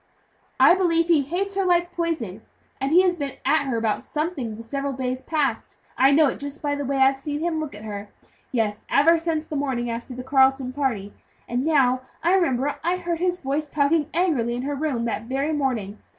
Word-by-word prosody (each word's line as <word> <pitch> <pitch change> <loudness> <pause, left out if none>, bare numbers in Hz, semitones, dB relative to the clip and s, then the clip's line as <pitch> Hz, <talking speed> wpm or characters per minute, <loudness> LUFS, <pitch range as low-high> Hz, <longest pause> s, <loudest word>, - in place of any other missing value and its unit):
"I - - +8
believe 340 -2 +2
he 325 -4 +5
hates 360 +8 -3
her 390 - +1
like 350 -1 +2
poison, 310 - -3 0.4
and 270 +2 -1
he 360 +3 +6
has 365 -1 +3
been 285 -5 -4
at 310 -2 +3
her 245 -3 0
about 225 -2 0
something 300 -8 -3
the 230 - -9
several 275 +4 -3
days 255 0 -3
past 300 -3 -2 0.2
I 265 - +5
know 300 +3 +5
it 275 - -1
just 285 +1 -6
by 290 -1 -1
the 285 0 -2
way 275 +1 -1
I've 270 0 +4
seen 290 +1 -4
him 325 0 -1
look 305 -8 -5
at 210 - -10
her 205 -1 -6 0.4
yes, 215 -4 0
ever 330 +4 +5
since 320 -2 -2
the 310 - -6
morning 260 -4 -1
after 235 +2 -6
the 255 - -6
Carleton 265 -1 +3
party. 240 -8 -2 0.3
And 245 +2 -1
now 265 -5 +3 0.2
I 345 +2 +3
remember 285 -7 +1
I 350 +2 +1
heard 345 -2 -3
his 360 0 0
voice 285 +2 -2
talking 295 +1 +1
angrily 295 -10 +1
in 245 - -4
her 290 +2 -2
room 275 -5 -1
that 225 -1 -3
very 275 +5 -1
morning. 235 -8 -2
280 Hz, 210 wpm, -24 LUFS, 250-325 Hz, 0.4 s, I